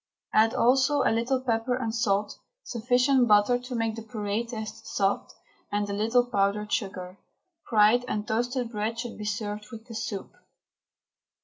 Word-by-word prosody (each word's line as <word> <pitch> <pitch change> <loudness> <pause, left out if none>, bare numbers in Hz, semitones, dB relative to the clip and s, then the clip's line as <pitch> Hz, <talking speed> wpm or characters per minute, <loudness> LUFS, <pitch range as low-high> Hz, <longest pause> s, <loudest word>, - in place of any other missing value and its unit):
Add 220 +1 +4
also 265 +3 +3
a - - +3
little 240 +3 +1
pepper 240 0 0
and 230 -3 -3
salt, 210 -3 0 0.2
sufficient 250 +2 +2
butter 210 +3 +4
to 250 0 -7
make 225 -1 -1
the 225 - -6
puree 215 -1 -3
taste 225 -1 -7
soft, 195 0 -1 0.4
and 205 0 0
a 200 - -3
little 225 +4 +2
powdered 210 -2 0
sugar. 190 -3 -3 0.5
Fried 220 +2 +4
and 210 -2 -3
toasted 245 +2 -1
bread 220 +1 -2
should 235 0 -5
be 210 - -5
served 210 0 -4
with 225 0 -10
the 240 - -10
soup. 215 -3 -5
225 Hz, 155 wpm, -27 LUFS, 210-245 Hz, 0.5 s, Add